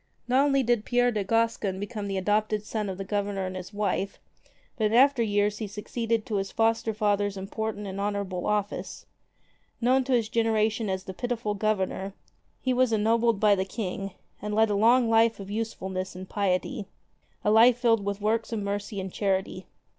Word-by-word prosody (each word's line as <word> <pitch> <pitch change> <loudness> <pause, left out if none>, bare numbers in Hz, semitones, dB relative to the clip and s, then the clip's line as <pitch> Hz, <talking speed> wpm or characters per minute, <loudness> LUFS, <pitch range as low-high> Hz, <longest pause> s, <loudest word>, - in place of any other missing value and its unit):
Not 255 +3 +4
only 275 -2 +3
did 240 -3 +1
Pierre 245 +1 +2
de 210 -3 -1
Gascon 225 -2 0
become 205 0 -4
the 195 -1 -2
adopted 210 +2 0
son 210 -2 -3
of 185 - -5
the 195 - -4
Governor 200 -1 -2
and 185 0 -5
his 185 +1 -7
wife, 200 -1 -2 0.6
but 220 - 0
in 215 - +1
after 270 0 +5
years 205 -1 +1
he 215 - -3
succeeded 225 +2 -2
to 210 - -2
his 195 0 -2
foster 225 0 +1
father's 205 -2 0
important 210 +2 -4
and 195 0 -5
honorable 200 -3 -2
office. 210 -1 -2 0.7
Known 255 +2 +3
to 265 - 0
his 230 -3 +2
generation 220 -1 +1
as 190 0 -2
the 190 - -7
Pitiful 230 0 -2
Governor, 195 -2 -1 0.4
he 255 - 0
was 255 -1 +3
ennobled 225 0 +2
by 210 -1 +5
the 190 -1 +1
King, 195 -1 -4 0.3
and 210 0 -3
led 220 0 +4
a - - +1
long 235 +4 +4
life 225 0 +3
of 195 0 -8
usefulness 190 -4 -4
and 185 +1 -8
piety, 195 0 -1 0.6
a 210 - +4
life 230 +2 +6
filled 230 -4 +2
with 200 0 -2
works 220 +2 0
of 225 - -1
mercy 205 0 -3
and 190 -1 -5
charity. 190 -2 -1
210 Hz, 185 wpm, -27 LUFS, 195-225 Hz, 0.7 s, life